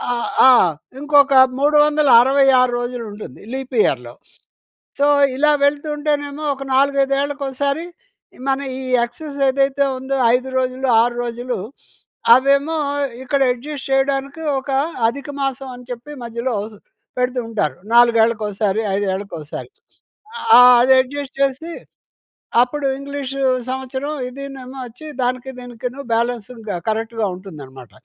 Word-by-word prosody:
ఆహ్, 235 - -3 0.2
ఆ! - - +8 0.5
ఇంకొక 285 -1 +4 0.3
366 275 -4 +4
రోజులుంటుంది 235 -4 -7
లీప్ 265 -1 -5
ఇయర్‌లో. 120 -3 -2 0.9
సో, 285 - +4 0.3
ఇలా 300 +2 +3
వెళ్తూంటేనేమో 295 0 -1
ఒక 275 - -10
నాలుగైదేళ్ళకోసారి 280 +2 0 0.6
మన 270 - +1 0.2
ఈ - - -6 0.2
ఎక్సస్ 285 +4 -10
ఏదైతే 275 +1 +1 0.2
ఉందో 270 +1 -2 0.2
5 255 +1 -1
రోజులు 255 +1 -2
6 240 0 -1
రోజులు, 240 0 -4 0.8
అవేమో 280 +4 +2 0.5
ఇక్కడ 275 +2 -1
యడ్జస్ట్ 275 +3 -8
చేయడానికి 275 +2 0 0.2
ఒక 270 +1 -6 0.4
అధికమాసం 275 0 -4
అని 245 0 -12
చెప్పి 245 +5 -7
మధ్యలో 235 +2 -3 0.6
పెడుతూ 250 0 0
ఉంటారు 210 -9 -2 0.2
నాలుగేళ్ళకోసారి, 220 -3 +3
ఐదేళ్ళకోసారి. 190 - -4 0.9
ఆహ్, 250 0 +9
అదెడ్జస్ట్ 265 +2 +2
చేసి, 275 +5 0 0.9
అప్పుడు 275 +3 -2
ఇంగ్లీషు 275 -1 -5 0.3
సంవత్సరం 265 +3 -4 0.2
ఇదినేమో 270 0 -9
వచ్చి 245 +7 -12 0.2
దానికి 255 +1 -2
దీనికి 245 -1 -6 0.3
బ్యాలెన్స్ 235 -1 -1 0.4
కరెక్ట్‌గా 225 0 -2
ఉంటుందనమాట. 140 - -11
265 Hz, 100 wpm, -19 LUFS, 240-280 Hz, 0.9 s, ఆహ్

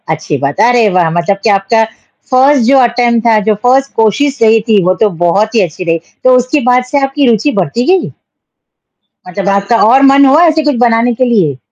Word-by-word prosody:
अच्छी 155 -2 -3
बात 140 0 -4
है, - - +3
अरे 240 -3 +2
वाह! 180 -3 0
मतलब 175 +4 -2
कि 225 - +1
आपका 200 +3 +1 0.5
फर्स्ट 265 +1 +2
जो 270 +3 +3
अटेम्प्ट 240 -2 0
था, 220 -2 +3
जो 215 +1 -1
फर्स्ट 265 +2 +1
कोशिश 265 +6 -1
रही 225 0 +3
थी, 205 -4 +2
वो 185 - +2
तो 215 - +3 0.2
बहुत 210 +7 0
ही 220 - +3
अच्छी 180 -1 -4
रही। 165 -1 -2 0.2
तो 255 0 +3
उसके 255 +4 -1
बाद 250 0 +2
से 285 - 0
आपकी 270 0 -1
रुचि 230 +6 0
बढ़ती 185 +9 -3
गई? 380 -1 -1 1.2
मतलब 195 +2 -4
आपका 200 +4 0
और 260 +4 +3
मन 280 0 +4
हुआ 290 +5 +3
ऐसे 315 -1 0
कुछ 295 -2 -1
बनाने 235 +1 0
के 255 - 0
लिए? 190 - 0
230 Hz, 210 wpm, -10 LUFS, 195-260 Hz, 1.2 s, मन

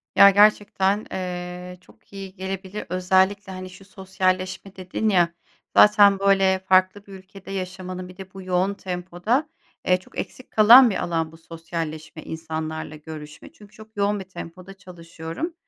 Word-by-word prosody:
Ya, 200 - +9
gerçekten, 205 0 +3
eee, 180 0 -6
çok 185 - -24
iyi 195 -1 -9
gelebilir. 190 +1 -6
Özellikle, 190 +2 +1
hani, 185 0 -8
şu 190 +2 -15
sosyalleşme 190 0 -3
dedin 185 +4 -2
ya, 175 -4 +2 0.4
zaten 205 -2 +6
böyle 195 -1 +3
farklı 190 +1 +2
bir 200 - -13
ülkede 190 0 -12
yaşamanın, 185 -1 -6
bir 180 - -14
de 190 -1 -11
bu 195 - -9
yoğun 185 +2 0
tempoda, 190 - -2 0.4
eee, 180 - +4
çok - - -17
eksik 255 - -8
kalan 235 +4 +8
bir 195 - -2
alan 165 -2 -2
bu 165 - -15
sosyalleşme, 165 -1 -7
insanlarla 160 -1 -5
görüşme. 150 0 -11
Çünkü 210 -1 -17
çok 220 0 -16
yoğun 205 +1 +1
bir 190 -1 -10
tempoda 185 +1 -10
çalışıyorum. 175 - -8
185 Hz, 150 wpm, -23 LUFS, 180-195 Hz, 0.4 s, Ya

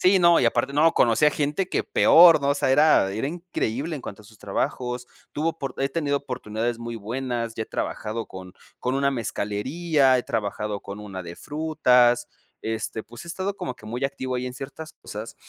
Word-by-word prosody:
Sí, 190 +1 +5
no, 170 -1 +6
y - - +2
aparte 120 +4 +1
no 160 +3 +4
conocí 120 +5 +4
a 150 - +5
gente 150 +6 -1
que - - 0
peor, 165 -2 +7
¿no? 140 - +2
O 140 - +3
sea, 130 - 0
era 145 -9 +5
era 110 +6 -2
increíble 160 -3 -3
en - - -8
cuanto 105 +1 -8
a - - -22
sus 110 0 -18
trabajos, 125 +4 -3 0.3
tuvo 155 +3 0
oport 140 -6 -6
he 135 - +1
tenido 145 -1 0
oportunidades 120 -3 -3
muy 115 0 -6
buenas, 115 +1 -3
ya 110 - -2
he - - -26
trabajado 110 +1 -4
con 95 -1 -10 0.3
con 125 +1 -1
una 140 0 +2
mezcalería, 130 - +1
he - - -1
trabajado 105 -1 -2
con 100 +1 -8
una 95 -3 -7
de 85 0 -8
frutas, 125 -6 +2 0.3
este, 110 0 -3
pues 120 +7 -11
he - - -11
estado 190 +3 -3
como 125 - -4
que 110 - -14
muy 120 +4 -3
activo 130 -2 -2
ahí 125 +1 -3
en 125 - -6
ciertas 140 +4 -8
cosas 110 +2 -7
125 Hz, 205 wpm, -24 LUFS, 110-150 Hz, 0.3 s, peor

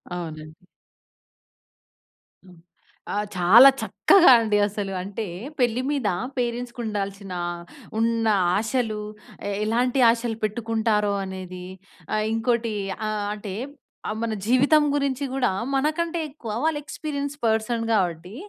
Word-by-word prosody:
అవునండి. 155 0 -8 1.8
హ్మ్. 180 -2 -16 0.6
ఆ! - - -2 0.2
చాలా 215 +10 +8
చక్కగా 375 -7 +5
అండి. 215 -2 +1
అసలు 200 -1 -4
అంటే 200 +4 -5 0.3
పెళ్లి 245 -1 +2
మీద 275 -7 -1 0.3
పేరెంట్స్‌కి 245 0 -3
ఉండాల్సిన, 200 -2 -4 0.7
ఉన్న 230 0 +1 0.3
ఆశలు 220 0 -1 0.5
ఎ - - -2
ఎలాంటి 245 +4 +1
ఆశలు 230 -1 0
పెట్టుకుంటారో 215 -1 0
అనేది 185 -1 -7 0.5
ఆహ్, 215 0 +1
ఇంకోటి 230 0 0 0.3
ఆహ్, 210 -1 -2
అంటే 205 -2 -7 0.7
మన 230 -1 -1
జీవితం 280 +6 +4
గురించి 280 -1 -1
కూడా 265 -2 +1 0.3
మనకంటే 325 +5 0
ఎక్కువ 270 -6 -8
వాళ్ళు 320 -1 +1
ఎక్స్‌పీరియన్స్ 285 -1 -4
పర్సన్ 225 +1 +1
గావట్టి, 180 -2 -1
225 Hz, 105 wpm, -24 LUFS, 205-250 Hz, 1.8 s, చాలా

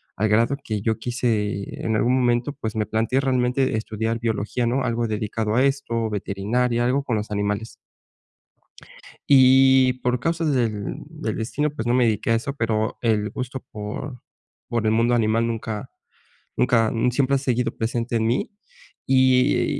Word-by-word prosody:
al 110 - +1
grado 115 +6 +3
que 105 -2 -3
yo 110 +1 -1
quise 110 -5 -2
en 110 - 0
algún 120 +3 +2
momento, 120 +2 +1
pues, 110 -6 -5
me 110 -1 0
planteé 115 +5 0
realmente 130 -1 +1
estudiar 110 +1 -3
biología, 115 +1 -1
no 130 +3 0
algo 115 -1 -1
dedicado 110 0 -2
a 130 - +4
esto, 135 -5 0
veterinaria, 115 +4 -1
algo 135 +3 +1
con 125 -4 -1
los 105 0 -4
animales. 105 +2 -2 1.5
Y 130 -1 +6
por 125 0 0
causas 165 +2 0
del 110 -5 -2
del - - -5
destino, 140 +7 -1
pues, 120 -5 -5
no 120 - +2
me 125 -1 +4
dediqué 110 0 0
a - - +4
eso, 120 +5 -3
pero, 110 -3 -1
el 110 -3 +1
gusto 130 +2 -5
por 110 +5 -6 0.5
por 115 -2 -1
el 110 - +3
mundo 115 +2 +2
animal 115 0 +2
nunca 110 -2 -4 0.7
nunca 115 -3 +2 0.2
siempre 140 +2 +2
ha - - +1
seguido 125 -2 -1
presente 115 +1 -2
en 110 -1 +1
mí, 120 - 0 0.6
y, 130 -1 +4
eh, - - +1
115 Hz, 165 wpm, -23 LUFS, 110-130 Hz, 1.5 s, Y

